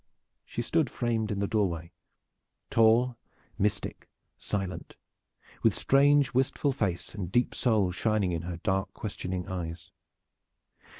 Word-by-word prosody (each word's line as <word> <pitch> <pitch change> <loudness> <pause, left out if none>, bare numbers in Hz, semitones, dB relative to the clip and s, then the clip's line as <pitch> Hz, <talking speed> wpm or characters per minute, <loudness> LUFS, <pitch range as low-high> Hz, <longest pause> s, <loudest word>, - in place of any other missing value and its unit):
She 120 - -4
stood 155 +1 +1
framed 115 -3 -1
in 100 - -2
the 100 - +1
doorway, 85 -7 -1 0.8
tall, 115 +2 +4 0.4
mystic, 105 +1 -1 0.3
silent, 95 -2 -4 0.7
with - - +3
strange, 140 +1 +4
wistful 135 +2 +1
face 100 -10 -2
and 95 -4 -5
deep 120 +4 +2
soul 110 -7 +2
shining 100 0 +1
in 85 -2 -2
her 85 0 -5
dark, 95 +1 -1
questioning 95 -4 -4
eyes. 85 -3 -5
105 Hz, 120 wpm, -29 LUFS, 90-120 Hz, 0.8 s, tall